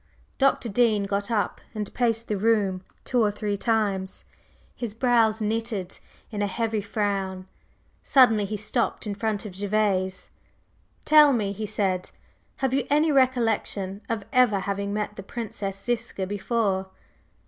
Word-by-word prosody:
Dr. 270 -2 +2
Dean 220 -1 +2
got 200 +1 -2
up 215 -3 -1
and 210 -2 -4
paced 230 -2 0
the 210 - -1
room 200 -3 +1 0.2
two 250 -2 +1
or 210 - +3
three 205 0 -2
times, 200 -3 -1 0.5
his 230 -4 -5
brows 230 -3 +3
knitted 215 -3 -2 0.3
in 210 -2 -3
a 205 - +1
heavy 220 +1 -1
frown. 195 -2 -2 0.5
Suddenly 225 -7 +5
he 210 +2 -3
stopped 225 +4 -1
in 210 - -2
front 210 0 -2
of 205 - -7
Gervase. 195 -2 0 0.7
"Tell 300 -2 +7
me," 210 -5 0
he 210 +2 -4
said, 190 -3 -1 0.6
"have 260 - 0
you 265 -2 0
any 300 +2 +3
recollection 225 -7 +1
of 225 -3 -2
ever 240 -6 +4
having 200 +1 -2
met 210 0 -3
the - - -5
Princess 195 -2 -5
Ziska 235 -4 -2
before?" 200 -1 -1
210 Hz, 145 wpm, -25 LUFS, 200-230 Hz, 0.7 s, Tell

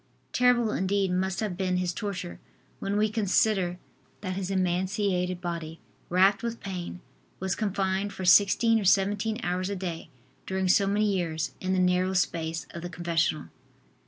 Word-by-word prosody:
Terrible 245 -3 +3
indeed 190 -1 0
must 190 +2 -1
have 210 -5 -2
been 185 -1 0
his 180 -1 -1
torture 185 - -5 0.4
when 200 +1 -1
we 215 +1 +3
consider 200 -3 +1 0.4
that 185 -2 -3
his 190 0 -3
emaciated 185 0 0
body, 165 -2 -5 0.3
racked 190 +3 +4
with 235 0 -4
pain, 180 -2 -6 0.4
was 190 0 -1
confined 195 -1 -1
for 190 - -6
sixteen 205 +5 +5
or - - -3
seventeen 205 +3 +2
hours 180 +2 -1
a 200 - -2
day, 175 -3 -5 0.4
during 190 0 -1
so 195 +2 +4
many 205 +2 +2
years, 170 -6 -1
in 185 0 0
the - - +1
narrow 180 +1 +2
space 165 -3 -1
of 170 - -7
the 175 - -5
confessional. 170 -3 -1
190 Hz, 160 wpm, -27 LUFS, 180-200 Hz, 0.4 s, sixteen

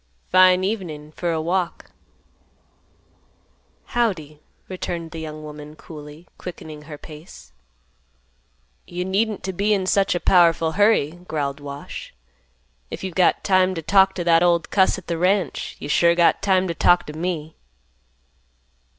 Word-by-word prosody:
"Fine 185 0 +6
evening 170 -8 -4
for 170 +2 -2
a 160 - -1
walk." 175 +2 -2 2.0
"Howdy," 165 - -1 0.3
returned 170 -3 -5
the 165 - -7
young 155 -1 -7
woman, 150 0 -10
coolly, 150 +1 -12
quickening 155 -4 -8
her 150 - -7
pace. 150 - -13 1.3
"You 180 +1 -4
needn't 205 +3 -1
t' 190 - -2
be 205 +3 +1
in 190 -2 -2
such 195 0 +2
a - - 0
powerful 165 -3 +4
hurry," 175 -5 +2
growled 145 -2 -3
Wash. 140 0 -8 0.7
"If - - -7
you've 190 -2 -4
got 180 +1 +2
time 185 -1 +3
t' 165 - -5
talk 195 +3 +4
t' 175 - -2
that 165 -1 +4
old 170 -1 +2
cuss 190 -1 +3
at 185 - -10
th' - - -6
ranch, 185 -1 0
you - - -7
sure 170 +3 +3
got 170 -1 +3
time 190 -1 +2
t' 170 - -2
talk 175 +1 +3
t' 150 - -8
me." 160 -1 -4
175 Hz, 145 wpm, -22 LUFS, 155-185 Hz, 2.0 s, Fine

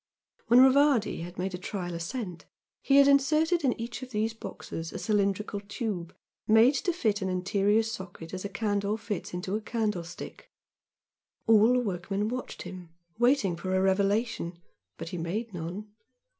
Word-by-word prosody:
When 240 +2 +7
Rivardi 265 - +4
had 175 +1 -8
made 185 +1 -2
a 180 - -4
trial 180 -2 -4
ascent 175 +1 -5 0.4
he 275 - +2
had 280 0 +8
inserted 310 +5 +3
in 255 -4 +1
each 235 +3 -5
of 255 - -7
these 220 -1 -1
boxes 165 -6 -7
a - - -5
cylindrical 205 -1 0
tube 200 -4 -5 0.3
made 225 +5 +6
to 355 +6 0
fit 215 - 0
an 190 - -1
interior 200 +4 +2
socket 190 -6 -7
as 185 - -4
a 200 - -3
candle 205 0 -1
fits 210 -4 -5
into 180 +2 -3
a 215 - -2
candle 210 -5 -1
stick, 170 0 -10 1.0
all 225 +2 +6
the 250 - +3
workmen 200 0 -2
watched 255 +1 -5
him, 180 -1 -9 0.3
waiting 240 -7 +3
for 185 +2 -2
a - - +3
revelation, 195 -1 +1 0.4
but 165 0 -6
he 180 - -5
made 205 +7 -3
none. 180 +5 -6
205 Hz, 165 wpm, -28 LUFS, 185-230 Hz, 1.0 s, had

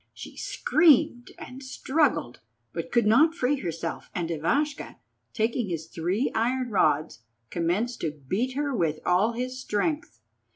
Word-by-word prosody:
She - - -10
screamed 290 -6 +3
and 255 +2 -9
struggled, 265 - 0 0.3
but 170 0 -5
could 235 -2 +3
not 300 +10 +5
free 280 -2 +1
herself, 165 - -5
and 170 -2 -2
Ivashka, 280 - -1 0.4
taking 225 -1 0
his 165 -2 -3
three 175 +9 -1
iron 245 +2 0
rods, 155 - +2 0.3
commenced 190 +9 -1
to 160 - 0 0.2
beat 245 - 0
her 285 -2 -1
with 165 -6 0
all 195 +6 +3
his 255 +2 -4
strength. 300 - -2
230 Hz, 135 wpm, -27 LUFS, 170-260 Hz, 0.4 s, not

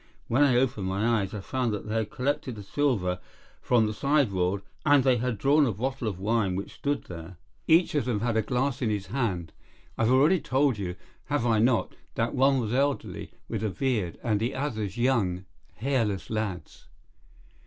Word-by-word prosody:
When 120 +5 +2
I 140 -4 +5
opened 120 -7 0
my 105 +4 +1
eyes 95 -1 -4
I 105 - -5
found 125 +2 -1
that 105 - -5
they 105 - -3
had 110 -2 -1
collected 135 -1 -2
the 105 - -8
silver 100 -7 0 0.4
from 120 -3 +3
the 105 - -2
sideboard, 100 -9 +1 0.2
and 145 -3 +5
they 130 -2 +4
had 125 -2 -1
drawn 140 +5 +4
a - - +1
bottle 125 +4 -3
of 100 -4 -3
wine 100 -1 0
which 100 - -5
stood 145 0 -2
there. 85 0 -9 0.3
Each 165 +2 +4
of 145 -5 +1
them 115 -5 -1
had 120 -1 0
a 110 - +3
glass 125 +3 -1
in 120 - +1
his 105 -2 -2
hand. 95 -11 -1 0.5
I - - +3
have 115 - +3
already 150 +8 +5
told 135 -5 +1
you, 90 -3 -3 0.3
have 145 -5 -1
I 115 -2 +3
not, 120 +1 +2 0.2
that 115 +1 0
one 135 0 +3
was 115 -2 -2
elderly, 140 +2 -1 0.2
with 110 -2 -3
a 110 - +1
beard, 105 -4 -1
and 110 -4 +1
the 120 +5 -1
others 110 -7 -3
young, 105 -8 +1 0.3
hairless 115 -6 -1
lads. 100 -7 -4
115 Hz, 195 wpm, -27 LUFS, 100-135 Hz, 0.5 s, I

